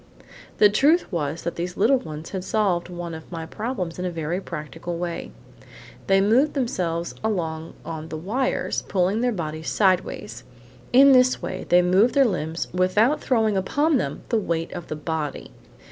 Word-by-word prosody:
The 210 - +7
truth 290 - +3
was 160 -2 -2
that 170 - -4
these 175 +1 -4
little 250 +7 +4
ones 155 -8 -8
had 190 -2 -4
solved 185 -5 0
one 175 -1 -6
of 160 +1 -10
my 165 -2 -5
problems 185 -3 -4
in 180 - -2
a - - 0
very 165 +2 -3
practical 170 0 -6
way. 170 - -4 0.8
They 195 0 +5
moved 240 +10 +3
themselves 175 -10 -1
along 165 -7 -2
on 160 -1 -6
the 155 - -5
wires, 225 +11 -1
pulling 190 +4 0
their 245 0 +2
bodies 160 -5 -4
sideways. 185 -3 0 0.5
In 275 +3 +7
this 255 -1 +5
way, 185 - -5
they 180 0 +6
moved 190 +8 +3
their 275 -1 +6
limbs 165 -6 -2
without 205 +10 +2
throwing 220 -5 +2
upon 290 - +2
them - - -3
the 230 - +2
weight 165 -4 -2
of 175 -2 -7
the - - -4
body. 155 -1 -4
180 Hz, 170 wpm, -24 LUFS, 165-220 Hz, 0.8 s, The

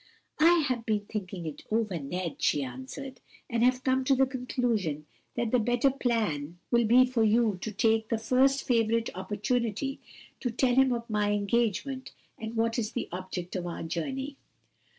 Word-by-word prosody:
"I 330 0 +5
have 245 -4 -1
been 210 -2 -1
thinking 190 -5 -5
it 155 -2 -6
over, 215 -5 0
Ned," 170 +4 -4
she 145 - +2
answered, 260 - -8 0.3
"and 230 0 0
have 255 +1 +3
come 260 0 +2
to 270 - +4
the 265 +1 +4
conclusion 240 - -1 0.3
that 235 -2 -1
the 250 - +4
better 245 +4 +2
plan 210 - -1
will 235 -1 +4
be 245 +4 +6
for 250 -3 +1
you 220 -3 +3
to 220 - -3
take 220 +1 +2
the 230 - +1
first 260 +4 +3
favorable 230 -2 +1
opportunity 225 +7 -2 0.4
to 245 - -1
tell 245 +2 +1
him 265 +1 +5
of 235 -1 -2
my 210 -2 +1
engagement 235 +5 -1 0.3
and 225 +1 -5
what 230 +1 +1
is 220 -1 -3
the 245 - -3
object 180 0 -5
of 175 -1 -2
our 170 - -5
journey." 265 - -4
230 Hz, 170 wpm, -29 LUFS, 205-255 Hz, 0.4 s, be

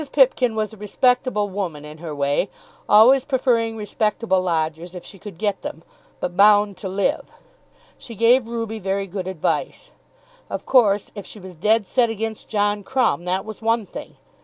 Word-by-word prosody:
Pipkin 255 -4 +3
was 215 0 -2
a - - -12
respectable 230 +1 +1
woman 180 -7 -5
in 150 +1 -11
her 160 -3 -6
way, 145 +6 0 0.4
always 245 +5 +7
preferring 240 -5 0
respectable 210 -2 0
lodgers 165 0 -2
if 180 - -9
she 195 - -12
could 200 -3 -10
get 205 0 -1
them; 160 - -7 0.4
but 175 - -4
bound 205 0 +5
to 190 - -5
live. 195 +2 -1 0.7
She 230 - -9
gave 230 +3 +4
Ruby 230 -1 -4
very 195 0 -2
good 190 -1 -5
advice. 190 - -3 0.6
Of - - -5
course 210 -6 +3
if 205 -3 -8
she 215 - -10
was 185 -1 -10
"dead 210 +6 +2
set" 235 +4 +2
against 225 0 -4
John 205 -1 0
Crumb, 250 -7 0
that 185 +2 -1
was 220 0 -9
one 225 -1 +1
thing! - - -10
210 Hz, 170 wpm, -22 LUFS, 185-225 Hz, 0.7 s, always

